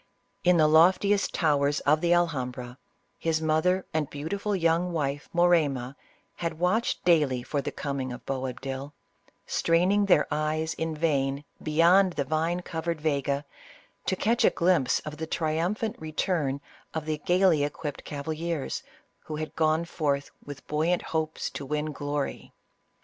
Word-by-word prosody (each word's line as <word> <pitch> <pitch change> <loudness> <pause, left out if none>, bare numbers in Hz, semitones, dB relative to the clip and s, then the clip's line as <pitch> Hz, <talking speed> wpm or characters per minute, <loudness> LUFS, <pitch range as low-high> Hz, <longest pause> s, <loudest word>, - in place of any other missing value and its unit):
In 180 0 +5
the 155 - +5
loftiest 185 +6 +4
towers 145 -3 +2
of 150 +2 +3
the 175 -1 +2
Alhambra, 130 -7 0 0.4
his 160 -1 0
mother 160 +4 +1
and 155 -3 0
beautiful 200 +8 -3
young 170 0 +1
wife 145 -3 -2
Morayma 150 -7 +2 0.4
had 170 -2 -3
watched 185 +8 0
daily 150 -8 +3
for 145 +2 -2
the - - -4
coming 140 -3 -3
of 125 - -8
Boabdil; 135 +1 -4 0.5
straining 185 +5 +2
their 165 -6 +5
eyes 155 +1 -1
in 160 -1 -3
vain 140 -3 0 0.2
beyond 170 +4 +4
the 145 - -1
vine 160 +4 0
covered 165 -1 -3
Vega, 140 -2 0 0.6
to - - +2
catch 230 +5 +1
a - - +7
glimpse 170 -7 +2
of 150 0 -7
the 160 +1 -4
triumphant 170 +8 -1
return 155 -3 -1 0.3
of 160 -1 -2
the 155 -1 -2
gaily 175 -2 +3
equipped 145 0 -4
cavaliers, 155 +1 -3 0.4
who 155 - -5
had 155 0 -5
gone 160 +1 +2
forth 145 -4 -1
with 145 -2 -9
buoyant 160 +4 0
hopes 160 -1 -1
to - - -6
win 150 +2 -2
glory. 145 -1 -4
155 Hz, 145 wpm, -27 LUFS, 145-170 Hz, 0.6 s, a